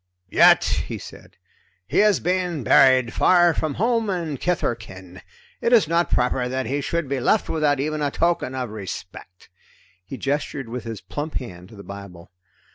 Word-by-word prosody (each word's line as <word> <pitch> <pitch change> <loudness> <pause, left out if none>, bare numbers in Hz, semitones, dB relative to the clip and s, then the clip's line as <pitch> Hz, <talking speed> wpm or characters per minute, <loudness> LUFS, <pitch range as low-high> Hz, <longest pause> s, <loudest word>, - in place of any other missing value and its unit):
"Yet," - - +6 0.2
he - - -5
said, - - -13 0.5
"he - - +2
is 210 -3 +4
being 180 -4 -1
buried 130 0 +5
far 175 -2 +4
from 155 -2 -2
home 230 0 0
and 165 -7 -3
kith 180 -1 -1
or - - +1
kin. 90 -4 -12 0.4
It 235 - +1
is 220 -9 +5
not 170 +2 +1
proper 125 0 0
that 130 +1 -2
he 140 +5 -2
should 170 +1 -2
be 135 0 -2
left 205 - +1
without 150 -3 +1
even 155 +2 -2
a 145 - +1
token 165 -4 0
of 125 -4 -4
respect." 95 -3 -9 0.5
He 105 +8 -8
gestured 140 -2 -3
with 120 0 -6
his 115 -3 -6
plump 145 - -6
hand 90 -7 -7
to - - -14
the 100 - -11
Bible. 100 -4 -11
135 Hz, 180 wpm, -22 LUFS, 115-170 Hz, 0.5 s, Yet